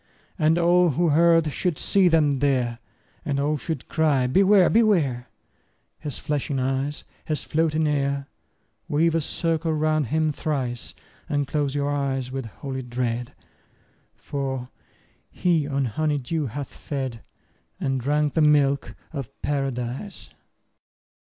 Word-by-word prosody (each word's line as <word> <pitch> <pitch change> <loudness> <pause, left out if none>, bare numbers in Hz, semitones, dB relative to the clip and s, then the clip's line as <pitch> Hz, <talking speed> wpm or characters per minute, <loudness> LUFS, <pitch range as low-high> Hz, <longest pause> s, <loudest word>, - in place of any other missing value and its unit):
And 160 +1 +3
all 175 +1 +4
who 165 +4 +1
heard 165 -1 +4
should 175 -5 -1
see 195 -2 +3
them 150 -5 +3
there, 125 -4 +1 0.4
And 140 -1 -1
all 150 +2 +1
should 150 -1 -5
cry, 150 -5 +2
Beware! 190 +7 +5
Beware! 170 - +2 0.7
His 145 -4 -5
flashing 145 -1 -2
eyes, 135 +3 -1 0.2
his 155 -1 -2
floating 160 0 +1
hair! 140 -1 0 0.6
50 - - -6
Weave 165 +2 +3
a 165 - +2
circle 165 +1 -1
round 155 -2 +1
him 155 +4 +1
thrice, 130 -6 -3 0.3
And 145 -2 0
close 145 -2 -1
your 145 0 0
eyes 135 -3 -1
with 135 -3 -4
holy 130 +3 -6
dread, 120 -1 -3 0.8
For 135 -3 -4 0.6
he 165 -5 +1
on 140 -1 0
honey 150 +6 0
dew 145 +3 -2
hath 140 +5 -6
fed, 130 -5 -5 0.6
And 135 -1 0
drunk 150 +3 +1
the 160 - +2
milk 145 -2 +3 0.2
of 135 -6 -4
Paradise. 135 - -3
145 Hz, 130 wpm, -24 LUFS, 135-160 Hz, 0.8 s, Beware